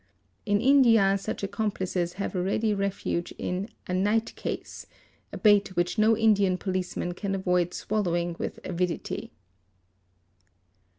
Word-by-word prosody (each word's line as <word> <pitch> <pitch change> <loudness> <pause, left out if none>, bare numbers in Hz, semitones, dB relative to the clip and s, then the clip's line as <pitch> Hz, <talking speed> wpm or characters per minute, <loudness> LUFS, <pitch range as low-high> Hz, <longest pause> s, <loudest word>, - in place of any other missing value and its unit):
In 205 0 +3
India, 230 -7 +5
such 195 - -5
accomplices 190 -4 -2
have 195 - -4
a 180 - 0
ready 210 +4 +1
refuge 195 -3 -2
in 185 +4 -3 0.2
"a 180 - -4
night 210 +5 +1
case'',—a - - -8
bait 205 -3 +4
which 175 +5 0
no 220 +1 +4
Indian 205 -4 +3
police 185 -2 -3
man 175 - -2
can 195 +2 -3
avoid 180 -2 +1
swallowing 175 -5 -1
with - - -4
avidity. 180 -1 -3
195 Hz, 125 wpm, -27 LUFS, 180-210 Hz, 0.2 s, India